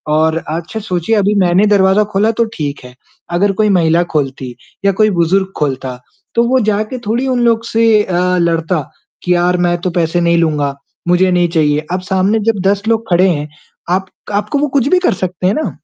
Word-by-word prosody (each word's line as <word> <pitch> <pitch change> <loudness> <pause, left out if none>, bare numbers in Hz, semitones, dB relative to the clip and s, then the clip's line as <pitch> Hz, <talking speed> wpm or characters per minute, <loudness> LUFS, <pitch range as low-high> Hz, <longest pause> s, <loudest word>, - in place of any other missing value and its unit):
और 160 +1 +2
अच्छा 170 +7 -4
सोचिए 185 +1 -1
अभी 205 0 +1
मैंने 180 +4 +3
दरवाजा 200 0 +3
खोला 215 +3 +2
तो - - +3
ठीक 145 -2 -4
है, 125 0 -13 0.4
अगर 195 +3 +2
कोई 210 - +2
महिला 170 -2 +3
खोलती 135 -4 -3 0.3
या 200 - +4
कोई 215 - +5
बुजुर्ग 190 +3 +1
खोलता, 130 -3 -3 0.4
तो 235 - +4
वो 260 0 +3
जाके 215 +4 -2
थोड़ी 240 +5 0
उन 250 -2 0
लोग 230 -1 +2
से 225 -2 +3
अ, 180 0 0
लड़ता 165 -1 0 0.4
कि 180 - +2
यार 180 +1 +1
मैं 175 0 +1
तो 185 - -1
पैसे 175 0 +1
नहीं 170 0 +2
लूँगा, 150 -4 0 0.3
मुझे 180 +1 +3
नहीं 175 -1 +2
चाहिए। 150 -2 +1
अब 185 - -1
सामने 190 +3 0
जब 205 - -7
10 200 0 +1
लोग 225 -1 0
खड़े 180 +2 +4
हैं, 150 -3 -2 0.4
आप 190 +2 0 0.3
आपको 210 +7 -1
वो 295 - +1
कुछ 265 +1 +1
भी 365 0 +4
कर 360 - +1
सकते 180 0 -3
हैं 195 - +2
ना, 310 - -2
185 Hz, 200 wpm, -14 LUFS, 165-210 Hz, 0.4 s, कोई